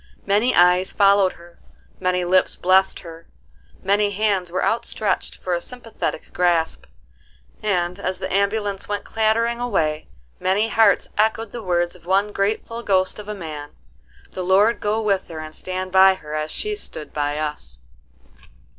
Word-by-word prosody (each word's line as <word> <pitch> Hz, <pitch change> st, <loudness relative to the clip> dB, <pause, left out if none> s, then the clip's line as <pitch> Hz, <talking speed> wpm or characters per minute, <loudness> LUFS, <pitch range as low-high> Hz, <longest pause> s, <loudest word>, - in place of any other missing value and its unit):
Many 210 Hz, +5 st, +2 dB
eyes 180 Hz, +1 st, +4 dB
followed 200 Hz, -2 st, +4 dB
her,—many 180 Hz, +1 st, -5 dB
lips 185 Hz, +1 st, +3 dB
blessed 190 Hz, +1 st, +2 dB
her, 165 Hz, -1 st, -12 dB, 0.6 s
many 205 Hz, +2 st, +2 dB
hands 200 Hz, -3 st, 0 dB
were 185 Hz, -, 0 dB
outstretched 220 Hz, -3 st, -1 dB
for 180 Hz, -, -4 dB
a 170 Hz, -, -1 dB
sympathetic 235 Hz, +1 st, -5 dB
grasp: 170 Hz, -2 st, +1 dB, 0.8 s
and, 180 Hz, -3 st, -1 dB
as 185 Hz, -1 st, -2 dB
the -, -, -4 dB
ambulance 200 Hz, 0 st, 0 dB
went 205 Hz, -1 st, -2 dB
clattering 230 Hz, +2 st, 0 dB
away, 160 Hz, -11 st, -1 dB, 0.3 s
many 205 Hz, +4 st, +1 dB
hearts 220 Hz, -4 st, +3 dB
echoed 220 Hz, 0 st, +1 dB
the 240 Hz, -, -6 dB
words 175 Hz, -2 st, 0 dB
of 175 Hz, -1 st, -18 dB
one 200 Hz, +3 st, +2 dB
grateful 215 Hz, +3 st, -2 dB
ghost 190 Hz, -2 st, +1 dB
of 210 Hz, -, -9 dB
a 210 Hz, -, -4 dB
man, 155 Hz, -5 st, -8 dB, 0.6 s
"The 185 Hz, -, -5 dB
Lord 200 Hz, +5 st, +3 dB
go 210 Hz, +1 st, 0 dB
with 200 Hz, -3 st, 0 dB
her 165 Hz, -, -8 dB
and 155 Hz, 0 st, -7 dB
stand 185 Hz, +2 st, -5 dB
by 190 Hz, 0 st, +6 dB
her 150 Hz, -4 st, -10 dB
as 155 Hz, 0 st, -2 dB
she's 425 Hz, -, -2 dB
stood 150 Hz, -, -7 dB
by 145 Hz, 0 st, -1 dB
us." 150 Hz, -, -5 dB
190 Hz, 155 wpm, -22 LUFS, 175-210 Hz, 0.8 s, by